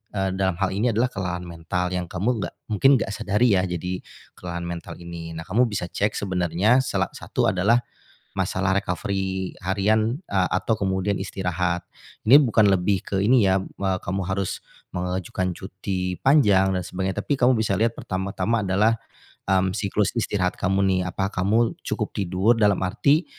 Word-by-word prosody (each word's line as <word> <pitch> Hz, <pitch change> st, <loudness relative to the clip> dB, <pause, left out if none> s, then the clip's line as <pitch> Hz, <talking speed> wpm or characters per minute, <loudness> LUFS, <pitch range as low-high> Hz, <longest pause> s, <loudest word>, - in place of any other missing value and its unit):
eee, 95 Hz, -1 st, 0 dB
dalam 95 Hz, -2 st, +1 dB
hal 95 Hz, -1 st, +1 dB
ini 110 Hz, +6 st, +1 dB
adalah 125 Hz, +3 st, +1 dB
kelelahan 90 Hz, -2 st, -3 dB
mental 90 Hz, +1 st, -3 dB
yang 90 Hz, -1 st, -2 dB
kamu 105 Hz, +7 st, -1 dB
nggak -, -, -5 dB, 0.2 s
mungkin 135 Hz, +7 st, +5 dB
nggak 110 Hz, -, -3 dB
sadari 105 Hz, +3 st, +2 dB
ya, 95 Hz, -, 0 dB
jadi 90 Hz, +1 st, -3 dB, 0.4 s
kelelahan 85 Hz, -1 st, -5 dB
mental 85 Hz, -1 st, -6 dB
ini. 85 Hz, -1 st, -8 dB
Nah 80 Hz, -, -5 dB
kamu 115 Hz, +10 st, +2 dB
bisa 100 Hz, -5 st, -3 dB
cek 105 Hz, +1 st, 0 dB
sebenarnya, 95 Hz, +5 st, +2 dB
salah -, -, -1 dB
satu -, -, -1 dB
adalah 110 Hz, +7 st, +2 dB, 0.5 s
masalah 95 Hz, 0 st, +1 dB
recovery 95 Hz, -1 st, -2 dB
harian, 105 Hz, +5 st, +1 dB
eee, 95 Hz, -6 st, +1 dB
atau 95 Hz, +5 st, +1 dB
kemudian 95 Hz, 0 st, 0 dB
istirahat. 90 Hz, -2 st, -2 dB, 0.4 s
Ini 125 Hz, +6 st, +9 dB
bukan 110 Hz, -6 st, +4 dB
lebih 95 Hz, 0 st, +1 dB
ke 100 Hz, -, -3 dB
ini 120 Hz, +2 st, +5 dB
ya, 95 Hz, 0 st, +4 dB
eee, 95 Hz, 0 st, -2 dB
kamu 95 Hz, +2 st, -2 dB
harus 95 Hz, 0 st, -2 dB, 0.3 s
mengajukan 90 Hz, +1 st, -2 dB
cuti 95 Hz, -1 st, -4 dB
panjang 105 Hz, -10 st, +4 dB
dan 90 Hz, -, -1 dB
sebagainya, 95 Hz, +1 st, -3 dB
tapi -, -, +1 dB
kamu 125 Hz, +1 st, +5 dB
bisa 110 Hz, -2 st, 0 dB
lihat 115 Hz, +3 st, +2 dB
pertama-tama 100 Hz, +4 st, -1 dB
adalah, 100 Hz, +4 st, +2 dB, 0.5 s
mmm, 95 Hz, -1 st, +2 dB
siklus 100 Hz, -1 st, 0 dB
istirahat 95 Hz, -5 st, 0 dB
kamu 95 Hz, 0 st, +1 dB
nih, 95 Hz, -1 st, +2 dB
apa 95 Hz, +2 st, -2 dB
kamu 110 Hz, +6 st, +1 dB
cukup -, -, -2 dB
tidur 95 Hz, +3 st, +2 dB
dalam 105 Hz, -3 st, +4 dB
arti, 140 Hz, -, +2 dB
95 Hz, 165 wpm, -24 LUFS, 90-105 Hz, 0.5 s, Ini